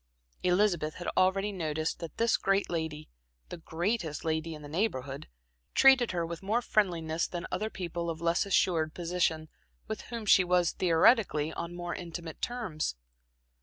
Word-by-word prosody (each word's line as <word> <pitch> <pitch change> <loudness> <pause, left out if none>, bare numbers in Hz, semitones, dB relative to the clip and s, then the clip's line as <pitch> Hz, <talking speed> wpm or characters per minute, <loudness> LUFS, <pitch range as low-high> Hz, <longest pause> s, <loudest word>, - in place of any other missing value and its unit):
Elizabeth 180 -4 +2
had 175 - -7
already 195 +2 +2
noticed 160 -4 -2
that 165 -3 -8
this 230 0 +3
great 195 -1 +1
lady, 160 -2 -3 0.4
the - - -6
greatest 165 0 -2
lady 160 0 -1
in 150 - -11
the - - -8
Neighborhood, 145 - -2 0.5
treated 265 -3 +6
her 170 -2 -1
with 165 0 -6
more 210 +5 +1
friendliness 170 -7 0
than 175 -1 -5
other 215 +3 -1
people 170 -3 -4
of 165 -1 -4
less 170 +1 +2
assured 165 -5 +1
position 170 -2 0 0.4
with 220 - -4
whom 230 -2 -5
she 195 -2 +6
was, 180 -1 +2
theoretically, 165 -3 +3
on 170 +1 -5
more 175 0 -4
intimate 170 -2 -7
terms. 205 - -2
175 Hz, 155 wpm, -30 LUFS, 160-195 Hz, 0.5 s, treated